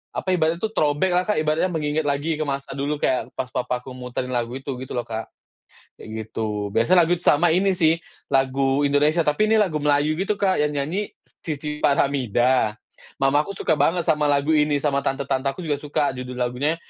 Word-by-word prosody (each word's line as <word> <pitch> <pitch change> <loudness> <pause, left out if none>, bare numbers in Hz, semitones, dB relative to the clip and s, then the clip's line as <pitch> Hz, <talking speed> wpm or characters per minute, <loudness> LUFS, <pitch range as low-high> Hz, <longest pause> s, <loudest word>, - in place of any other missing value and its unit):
apa - - -4
ibaratnya 165 0 +1
tuh 220 +1 -2
throwback-lah, 175 +5 +1
Kak, 210 - +1
ibaratnya 155 +4 +1
mengingat 150 -1 -1
lagi 150 +3 -1
ke - - +1
masa 140 0 -4
dulu 140 +2 -1
kayak 130 - 0
pas 130 0 -4
papaku 125 +1 -3
muterin 125 0 -5
lagu 120 0 -2
itu 135 +1 -5
gitu 130 - -7
loh, 120 - -1
Kak, 110 0 -5 0.7
kayak - - -12 0.2
gitu. 105 -2 -3
Biasa 115 +11 +1
lagu 175 +1 +3
sama 175 0 +4
ini 190 +3 +3
sih 165 -3 +3 0.3
lagu 135 +1 +1
Indonesia 150 +4 +2
tapi 155 +9 +2
ini 220 - +4
lagu 180 -8 +1
Melayu 145 +1 +2
gitu, 205 +2 0
Kak, 190 -5 +1
yang 150 0 +1
nyanyi 175 +9 -3 0.2
Cici 150 -1 -5
Faramida, 130 -5 +2 0.4
mamaku 145 +8 +1
suka - - 0
banget 165 +4 +2
sama 150 -1 +2
lagu 145 +2 +2
ini 150 -1 +3
sama 140 -2 +1
tante-tante 135 0 -1
aku 155 +6 -5
juga 145 -3 -1
suka 150 -1 -1
judul 125 -1 -7
lagunya 125 +6 -1
145 Hz, 185 wpm, -23 LUFS, 130-160 Hz, 0.7 s, sama